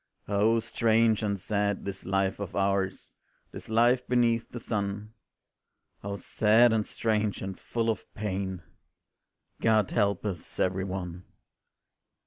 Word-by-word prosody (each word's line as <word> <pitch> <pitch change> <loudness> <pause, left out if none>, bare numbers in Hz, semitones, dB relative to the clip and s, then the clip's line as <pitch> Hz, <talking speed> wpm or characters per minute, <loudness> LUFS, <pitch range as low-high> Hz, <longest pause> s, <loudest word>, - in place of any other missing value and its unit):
Oh 105 +3 +3
strange 115 -1 +2
and 100 -2 -1
sad 100 +1 -1
this 95 -1 -6
life 95 0 0
of 100 -3 -5
ours, 100 -1 -1 0.3
This - - -9
life 120 +3 +3
beneath 120 -2 +2
the 120 - -7
sun; 105 -1 -3 0.9
O 100 0 -3
sad 110 +3 +4
and 110 -2 0
strange 110 -2 -1
and 95 0 -4
full 115 -1 -2
of 110 - -2
pain 95 -4 -3 1.0
God 110 -3 +3
help 100 -2 +1
us, 95 -5 -5
every 95 +1 +1
one. 90 -2 -5
105 Hz, 125 wpm, -28 LUFS, 95-115 Hz, 1.0 s, sad